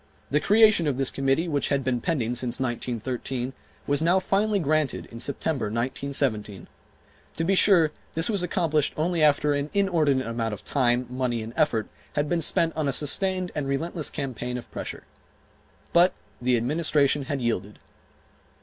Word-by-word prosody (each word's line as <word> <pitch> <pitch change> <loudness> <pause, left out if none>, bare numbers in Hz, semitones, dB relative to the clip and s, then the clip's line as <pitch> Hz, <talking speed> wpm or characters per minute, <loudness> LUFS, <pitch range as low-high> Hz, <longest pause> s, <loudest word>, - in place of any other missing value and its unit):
The 150 - +3
creation 210 -3 +4
of 135 -3 0
this 135 -1 +1
committee, 135 +5 0
which 145 -4 0
had 140 -1 +1
been 125 -2 -1
pending 125 -7 -1
since 125 0 -2
1913, 125 +1 -3 0.3
was 145 +1 +1
now 175 +3 +3
finally 205 +2 +1
granted 155 -4 0
in 115 - -8
September, 140 +2 -1
1917. 115 -3 -2 0.7
To 165 - -1
be 190 +4 +2
sure 180 -5 +5 0.2
this 165 +1 +2
was 205 -5 0
accomplished 165 -5 0
only 165 +2 0
after 150 -1 +4
an 145 +1 -2
inordinate 160 -9 +2
amount 115 -1 -2
of - - -14
time, 125 -2 +1
money 125 -2 -2
and 115 +1 -8
effort 150 -9 +1 0.3
had 145 0 0
been 170 +1 0
spent 165 +1 +2
on 155 -2 -1
a - - +2
sustained 185 +6 +1
and 145 -2 -3
relentless 155 +3 -1
campaign 125 -4 -4
of 120 - -10
pressure. - - -6 0.9
But 175 +2 +5 0.3
the 125 0 +2
Administration 145 +2 +1
had 140 0 -2
yielded. 105 -4 -2
140 Hz, 160 wpm, -25 LUFS, 125-165 Hz, 0.9 s, sure